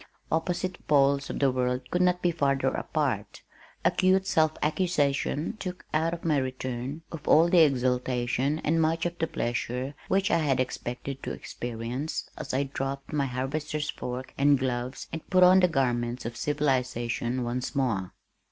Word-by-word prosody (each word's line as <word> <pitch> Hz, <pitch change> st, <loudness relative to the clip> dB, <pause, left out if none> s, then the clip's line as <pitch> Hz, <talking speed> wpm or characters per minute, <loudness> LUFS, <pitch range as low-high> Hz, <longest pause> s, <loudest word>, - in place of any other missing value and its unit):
Opposite 180 Hz, +3 st, -2 dB
poles 140 Hz, -1 st, +3 dB
of -, -, -3 dB
the 140 Hz, -2 st, +3 dB
world 125 Hz, 0 st, -1 dB
could 180 Hz, -, +1 dB
not 180 Hz, 0 st, +2 dB
be 175 Hz, -, +3 dB
farther 140 Hz, -4 st, +1 dB
apart. -, -, -2 dB, 0.4 s
Acute 190 Hz, 0 st, +3 dB
self 160 Hz, -5 st, +3 dB
accusation 155 Hz, +2 st, 0 dB
took 180 Hz, -1 st, -6 dB
out 160 Hz, +2 st, +2 dB
of 170 Hz, 0 st, -6 dB
my 155 Hz, -3 st, +3 dB
return 130 Hz, +2 st, -3 dB, 0.2 s
all 160 Hz, +2 st, +7 dB
of 170 Hz, -, -1 dB
the 180 Hz, -, +6 dB
exaltation 130 Hz, -1 st, +2 dB
and 165 Hz, +2 st, +2 dB
much 165 Hz, +1 st, +1 dB
of 175 Hz, 0 st, -3 dB
the 165 Hz, -, +1 dB
pleasure 125 Hz, +2 st, -2 dB
which 195 Hz, +1 st, +2 dB
I 170 Hz, -, +4 dB
had 140 Hz, -5 st, +1 dB
expected 125 Hz, +1 st, -3 dB
to -, -, -4 dB
experience 120 Hz, +5 st, -4 dB
as 155 Hz, -, -6 dB
I 135 Hz, +2 st, +1 dB
dropped 135 Hz, +1 st, -4 dB
my 140 Hz, -2 st, +1 dB
harvester's 150 Hz, +4 st, -2 dB
fork 125 Hz, +1 st, -6 dB
and 140 Hz, 0 st, +5 dB
gloves 125 Hz, 0 st, -3 dB
and 160 Hz, -, -3 dB
put 185 Hz, -1 st, +5 dB
on 185 Hz, +1 st, +8 dB
the 180 Hz, -, +5 dB
garments 120 Hz, -5 st, 0 dB
of 115 Hz, 0 st, -4 dB
civilization 125 Hz, -4 st, 0 dB
once 125 Hz, +4 st, -3 dB
more. 110 Hz, -9 st, 0 dB
140 Hz, 160 wpm, -28 LUFS, 125-160 Hz, 0.4 s, on